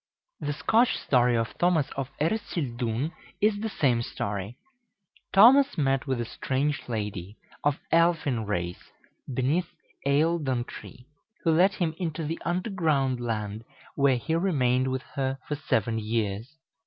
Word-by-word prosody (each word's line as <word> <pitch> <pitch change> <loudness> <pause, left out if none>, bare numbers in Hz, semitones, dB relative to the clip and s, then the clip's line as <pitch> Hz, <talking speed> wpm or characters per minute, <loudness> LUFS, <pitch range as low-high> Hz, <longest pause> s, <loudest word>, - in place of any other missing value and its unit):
The 145 - -2
Scotch 220 - +2
story 125 -2 +3
of 115 0 -2
Thomas 175 -5 +2
of 135 -1 -4
Ercildoune 140 - -1 0.3
is 210 0 +2
the 220 +1 -2
same 125 - +1
story. 100 0 -4 0.7
Thomas 260 +8 +7
met 135 -2 +1
with 130 -2 0
a 120 - -1
strange 135 +4 -2
lady, 105 -3 -4 0.3
of 145 -1 +2
elfin 165 -9 +2
race, 90 -4 -3 0.4
beneath 140 +8 0 0.4
Eildon 140 -4 +1
Tree, 125 - -11 0.4
who 165 - +3
led 180 +5 +4
him 170 -6 0
into 165 -3 -3
the 160 +2 -3
underground 165 - 0
land, 110 -2 -3 0.3
where 140 -2 +3
he 160 +7 -3
remained 130 -8 +2
with 130 0 -2
her 135 -1 -3
for - - -2
seven 115 -5 0
years. 110 +2 -2
135 Hz, 135 wpm, -27 LUFS, 120-165 Hz, 0.7 s, Thomas